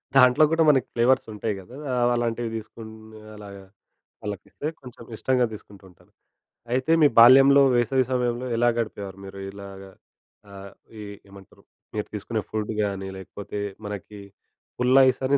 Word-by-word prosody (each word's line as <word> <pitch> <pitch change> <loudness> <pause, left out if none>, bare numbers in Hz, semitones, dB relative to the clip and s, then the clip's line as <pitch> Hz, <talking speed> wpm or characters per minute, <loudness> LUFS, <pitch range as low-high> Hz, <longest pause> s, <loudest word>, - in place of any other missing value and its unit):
దాంట్లో 125 +3 +6
గుడా 165 0 +3
మనకి 135 -4 +3
ఫ్లేవర్స్ 125 +2 +2
ఉంటాయి 105 0 -3
గదా? 115 +7 -13 0.3
అవ్ 120 0 +3
అలాంటివి 120 0 -2
తీసుకుని 110 0 -10 0.2
అలాగా 100 -2 -11 0.6
వాళ్ళకి 105 -2 -6
ఇస్తే 150 - -6
కొంచెం 125 -2 -12
ఇష్టంగా 125 +1 +1
తీసుకుంటూంటారు. 95 -4 -15 0.6
అయితే 130 +5 0
మీ 150 - +7
బాల్యంలో 135 +3 +8
వేసవి 125 +2 +2
సమయంలో 125 0 -1
ఎలా 120 0 +3
గడిపేవారు? 100 -4 -5
మీరు 95 0 -10
ఇలాగా 95 -1 -11 0.6
ఆహ్, 100 0 -10 0.3
ఈ - - -7 0.3
ఏమంటరు? 100 -1 -17 0.3
మీరు 105 - -3
తీసుకునే 105 +1 -3
ఫుడ్ 110 0 -3
గాని, 95 -1 -3
లేకపోతే 100 +2 -8 0.3
మనకి 105 0 -8 0.6
పుల్లైస్ 130 +1 +4
అని 140 +1 +3
110 Hz, 135 wpm, -24 LUFS, 100-125 Hz, 0.6 s, బాల్యంలో